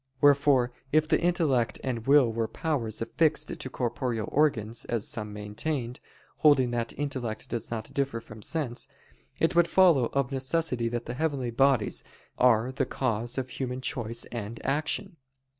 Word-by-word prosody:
Wherefore 140 -3 +4 0.2
if 155 +1 +3
the - - +2
intellect 155 -9 +1
and 120 -3 -3
will 135 -5 +5
were 115 0 -1
powers 120 -9 -2
affixed 150 +3 +1
to 130 - -5
corporeal 120 -3 -2
organs, 120 -7 +1
as 115 -3 -1
some 105 -2 -4
maintained, 115 +5 -4 0.4
holding 135 -5 +4
that 120 -1 -1
intellect 130 -6 -4
does 115 -2 -3
not 110 -2 -5
differ 140 -4 -1
from 110 -1 -12
sense; 135 -2 -2 0.5
it 165 - +2
would 170 0 +4
follow 170 -8 +5
of 140 -3 0
necessity 130 -3 0
that 120 0 -3
the 120 - -4
heavenly 135 -3 -1
bodies 130 -2 +2 0.4
are 125 0 +4
the 135 0 -1
cause 120 -2 -1
of 130 -1 -2
human 125 0 -4
choice 120 -2 -1
and 115 -1 -5
action. 155 +6 -1
125 Hz, 155 wpm, -28 LUFS, 115-145 Hz, 0.5 s, will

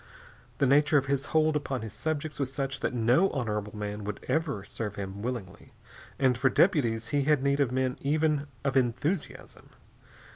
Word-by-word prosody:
The - - +2
nature 145 +3 +4
of 140 - +2
his 140 0 -1
hold 155 -1 +2
upon 135 -4 -2
his 110 - -7
subjects 155 -1 -3
was 135 -2 -1
such 135 -1 -3
that - - -1
no 120 +11 +4
honorable 105 -5 -3
man 105 0 -4
would 105 0 -6
ever 155 -11 -1
serve 105 0 -5
him 100 0 -6
willingly, 115 -6 -6 0.4
and 130 -2 +3
for 135 +3 +2
deputies 120 - +2
he 145 -1 +1
had 150 -2 +3
need 140 0 +2
of 135 -4 +2
men 130 0 -1
even 150 0 +1 0.2
of 140 -2 0
enthusiasm. 135 +7 -1
135 Hz, 175 wpm, -28 LUFS, 115-145 Hz, 0.4 s, nature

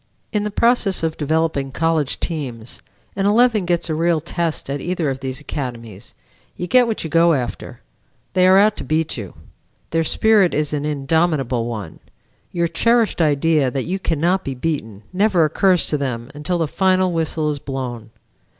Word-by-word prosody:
In 210 -1 +1
the 210 - -2
process 215 -4 +2
of 160 -1 -1
developing 155 -2 -1
college 160 -1 0
teams, 125 -9 -5 0.3
an 195 0 +1
eleven 220 -2 +3
gets 175 -1 0
a 160 - -1
real 165 +1 +1
test 165 +1 -3
at 140 0 -3
either 175 -5 -1
of 130 - -5
these 130 0 -5
academies; 120 -8 -7 0.4
you 175 - -3
get 250 +6 +4
what 225 - -2
you 160 - -4
go 170 +1 +4
after; 125 -5 -4 0.5
they 185 0 +4
are 190 +1 +6
out 210 +1 +4
to - - -5
beat 160 0 -1
you; 105 -6 -8 0.6
their 165 0 +1
spirit 205 +2 +3
is 150 0 -1
an 145 0 -2
indomitable 140 -4 0
one; 105 -8 -6 0.5
your 170 -1 0
cherished 225 +5 +1
idea 150 -2 +2
that 130 +1 -3
you 190 +3 -2
cannot 175 +2 0
be 135 - -4
beaten 125 -8 -4
never 190 -3 +3
occurs 180 +3 +2
to 150 - 0
them 125 -2 -4
until 150 +5 -2
the 165 -2 0
final 185 +2 +2
whistle 160 -2 -1
is 145 - -4
blown. 125 -5 -5
160 Hz, 175 wpm, -20 LUFS, 135-180 Hz, 0.6 s, are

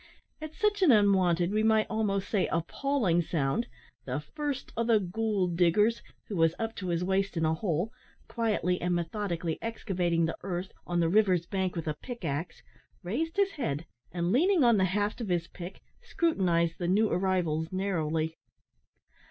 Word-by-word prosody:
At 310 0 -7
such 420 -2 +1
an 355 -7 +6
unwonted, 190 -5 +4
we 215 +1 +1
might 220 0 +3
almost 210 -3 -1
say, 200 -4 +1
appalling, 180 - 0
sound, 160 - -1 0.4
the 130 +1 -2
"first 285 - -5
o' 230 - 0
the 230 -2 +4
goold 195 -2 -1
diggers," 210 +7 +3 0.3
who 205 - -4
was 165 -1 +3
up 225 0 -3
to 185 - -4
his 170 0 0
waist 195 0 0
in 160 - +1
a 160 - +2
hole, 175 +4 -1 0.4
quietly 210 -6 0
and 180 0 +1
methodically 170 -2 -2
excavating 180 -7 0
the 165 - -2
earth 185 0 -4 0.2
on 175 0 +1
the 165 - +3
river's 185 -2 +3
bank 190 0 -2
with 165 -2 -4
a 155 - 0
pick 240 -7 -7
axe 160 +3 -4 0.4
raised 320 - -2
his 400 -1 +3
head, 160 - -3 0.3
and, 175 0 -1
leaning 340 - +4
on 235 -3 +5
the 190 - +3
haft 205 +5 -1
of 220 - -4
his 170 -1 0
pick, 180 +1 -9 0.2
scrutinised 185 - +1
the 175 - -1
new 210 +5 +3
arrivals 175 -5 0
narrowly. 160 -4 -1
185 Hz, 170 wpm, -29 LUFS, 170-220 Hz, 0.4 s, an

